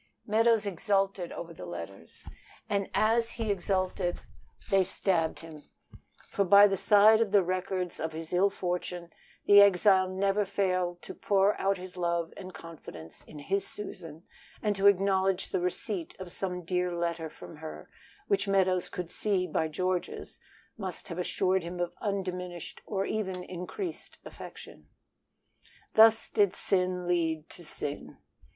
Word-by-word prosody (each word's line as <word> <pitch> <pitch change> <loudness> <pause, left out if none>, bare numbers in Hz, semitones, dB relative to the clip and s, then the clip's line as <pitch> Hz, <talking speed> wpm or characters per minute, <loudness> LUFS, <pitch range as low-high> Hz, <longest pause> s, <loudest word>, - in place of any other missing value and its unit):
Meadows 225 0 +3
exulted 195 -1 0
over 170 0 -7
the 90 - -9
letters; 85 0 -9 0.4
and 200 -1 -1
as 230 +1 +2
he 225 -3 -1
exulted 185 -1 -1 0.5
they 195 -1 +5
stabbed 175 -3 0
him, 160 -2 -11 0.7
for 200 - 0
by 200 +2 +8
the 195 -1 +2
side 210 +3 +6
of 220 -4 +1
the 200 -2 +5
records 185 0 -2
of 160 - -2
his 160 +1 -7
ill 190 +3 +4
fortune 180 -2 -4 0.3
the 205 0 +9
exile 190 -1 +5
never 195 +2 +1
failed 185 -3 -1
to - - -7
pour 200 0 +2
out 195 0 +2
his 185 0 -9
love 170 -1 -1
and 185 -1 -8
confidence 120 - -11
in 155 - -11
his 195 +7 -1
Susan 165 -6 -8 0.4
and 210 -1 0
to 195 +1 +4
acknowledge 195 -1 +2
the - - 0
receipt 180 0 -3
of 185 -2 -8
some 180 -1 -4
dear 180 +1 0
letter 170 -1 -2
from 160 - -12
her, 155 +1 -8 0.4
which 400 - +1
Meadows 185 -2 +2
could 175 -1 -6
see 195 -4 0
by 160 -2 0
George's 180 +3 -3 0.4
must 190 -3 -6
have 170 0 -5
assured 185 +1 +1
him 175 +1 -6
of 175 0 -2
undiminished 180 -4 -4
or 195 -2 -1
even 190 -4 -3
increased 185 - -6
affection. - - -11 1.1
Thus 225 0 +6
did 200 -3 +2
sin 180 -2 0
lead 165 -3 0
to 175 - -10
sin. 145 -2 -4
185 Hz, 145 wpm, -29 LUFS, 175-200 Hz, 1.1 s, the